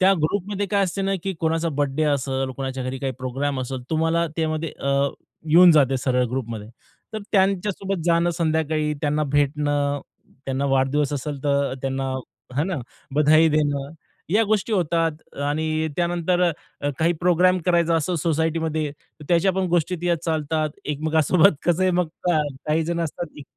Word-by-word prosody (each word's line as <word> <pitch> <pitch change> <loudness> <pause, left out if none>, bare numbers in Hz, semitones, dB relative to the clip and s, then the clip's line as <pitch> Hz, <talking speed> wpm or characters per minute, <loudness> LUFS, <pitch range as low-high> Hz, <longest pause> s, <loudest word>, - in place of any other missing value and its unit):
त्या 190 +1 +6
ग्रुपमध्ये 200 +4 -1
काय 200 0 +2
असते 195 +2 -3
ना, 195 0 0
की 195 - -2
कोणाचा 165 +1 +1
बर्थडे 145 0 -1
असेल, 135 -1 -1
कोणाच्या 130 -1 -4
घरी 130 +1 -4
काही 135 0 -2
प्रोग्राम 135 +2 -2
असेल, 130 0 -4
तुम्हाला 165 +1 +1
त्यामध्ये, 160 -1 -1
अ 140 0 +1 0.4
येऊन 175 +3 +8
जाते 135 -4 +4
सरळ 125 0 +1
ग्रुपमध्ये. 115 -5 -4 0.4
तर 220 - -3
त्यांच्यासोबत 195 -1 +1
जाणं 170 0 +3
संध्याकाळी, 155 -2 0
त्यांना 150 0 0
भेटणं, 145 0 +1 0.4
त्यांना 135 +1 -1
वाढदिवस 135 +2 +1
असेल, 145 0 -4
तर 140 -2 +1
त्यांना 135 0 -2 0.4
हे 145 - +2
ना, 185 -1 -2 0.4
बधाई 155 +2 +5
देणं, 145 -2 0 0.4
या 220 - +5
गोष्टी 215 +1 0
होतात. 165 -4 +1 0.3
आणि 155 +2 0
त्यानंतर 175 0 +1 0.5
काही 165 +2 +3
प्रोग्राम 180 +1 +4
करायचा 170 -2 +3
असो 165 +3 -1
सोसायटीमध्ये, 160 -1 0
तर 150 +1 -18
त्याच्या 175 +2 +3
पण 190 0 0
गोष्टी 175 +1 +1
त्यात 175 -1 +1
चालतात 155 -1 -1
एकमेकांसोबत 160 +5 +3
कसं 175 +1 +2
आहे 185 - +3
मग 180 -1 +1 0.2
का 175 -3 +3 0.3
काही 155 +1 +1
जण 170 +1 -2
असतात 165 +1 -3
जी 145 - -8
155 Hz, 155 wpm, -23 LUFS, 145-175 Hz, 0.5 s, येऊन